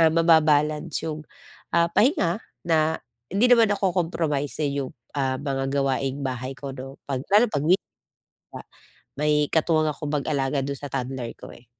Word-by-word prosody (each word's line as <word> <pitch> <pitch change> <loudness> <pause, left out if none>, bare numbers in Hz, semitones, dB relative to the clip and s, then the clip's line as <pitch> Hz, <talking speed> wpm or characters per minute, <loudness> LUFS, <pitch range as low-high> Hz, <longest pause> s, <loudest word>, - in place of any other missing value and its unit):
ah, 165 - +7
maba-balance 155 -1 +3
'yung, 155 -1 -4 0.5
ah, 170 0 +4
pahinga 220 - +2 0.2
na 160 -1 +2 0.3
hindi 205 +6 +4
naman 230 -3 +6
nako-compromise, 170 -7 -1
eh, 140 - 0
'yung, 130 - -5 0.2
ah, 130 -1 0
mga 135 -2 -2
gawaing-bahay 135 -1 -2
ko 140 -1 -6
'no, 135 +1 -8
pag 135 -2 -1
lalo 215 +4 +6
pag 145 0 -1
wee 180 +5 +4 0.7
nga, - - -7 0.6
may 150 0 +2
katuwang 155 -1 +2
akong 145 0 -5
mag-alaga 140 -1 0
doon 140 - -3
sa 145 -2 -7
toddler 130 -2 -3
ko, - - -11
eh. 120 - -18
150 Hz, 155 wpm, -24 LUFS, 135-165 Hz, 0.7 s, ah